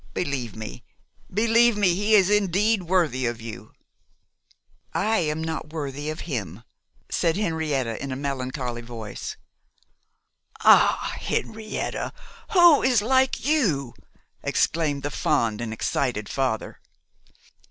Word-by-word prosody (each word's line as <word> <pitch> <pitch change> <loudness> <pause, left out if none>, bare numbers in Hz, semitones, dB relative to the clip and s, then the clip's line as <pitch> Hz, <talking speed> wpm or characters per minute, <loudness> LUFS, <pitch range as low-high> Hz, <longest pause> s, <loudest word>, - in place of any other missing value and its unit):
Believe 135 -8 -2
me, 110 -1 -8 0.5
believe 230 +2 +4
me, 195 -4 +3
he 205 +4 +3
is 195 -1 +5
indeed 210 +1 +2
worthy 165 -8 +1
of 120 -1 -3
you.' 115 -1 -9 1.2
'I 220 +2 +2
am 160 -1 -1
not 160 -1 -4
worthy 145 -1 -4
of 155 - -5
him,' 110 - -5 0.5
said 165 +1 +1
Henrietta, 155 - -1
in 140 - -4
a - - -2
melancholy 130 -3 -3
voice. 115 -3 -7 1.2
'Ah, - - +5
Henrietta, 220 0 -3 0.4
who 345 -5 +7
is 245 -5 +3
like 260 +3 +2
you!' 175 - +1 0.5
exclaimed 150 -4 0
the 145 - -2
fond 115 -7 0
and 115 -2 -4
excited 110 -1 -1
father. 130 -5 -2
155 Hz, 115 wpm, -24 LUFS, 125-205 Hz, 1.2 s, who